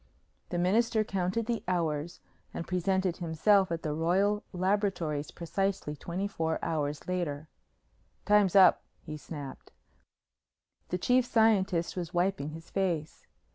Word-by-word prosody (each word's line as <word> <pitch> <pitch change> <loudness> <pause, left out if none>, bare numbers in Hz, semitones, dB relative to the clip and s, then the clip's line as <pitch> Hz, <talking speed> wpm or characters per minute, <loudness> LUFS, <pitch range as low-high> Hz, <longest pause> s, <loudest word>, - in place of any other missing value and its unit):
The 175 - -2
Minister 220 +5 +2
counted 195 +2 -1
the 235 0 -2
hours 165 -3 -1 0.3
and 170 - -5
presented 185 0 0
himself 185 +3 +2
at 165 -1 -3
the 150 - -1
Royal 190 +6 +1
Laboratories 185 -6 -1
precisely 185 -2 -2
twenty 175 +7 -3
four 160 -5 -2
hours 150 -2 -2
later. 160 -5 -2 0.8
"Time's 205 -2 +4
up," 190 -1 +7 0.2
he 155 -2 -6
snapped. 145 -2 -9 1.2
The 180 - -1
Chief 250 +7 +3
Scientist 205 -7 +2
was 175 -1 -5
wiping 175 -4 0
his 160 +2 -11
face. 175 -6 -2
180 Hz, 125 wpm, -30 LUFS, 160-195 Hz, 1.2 s, up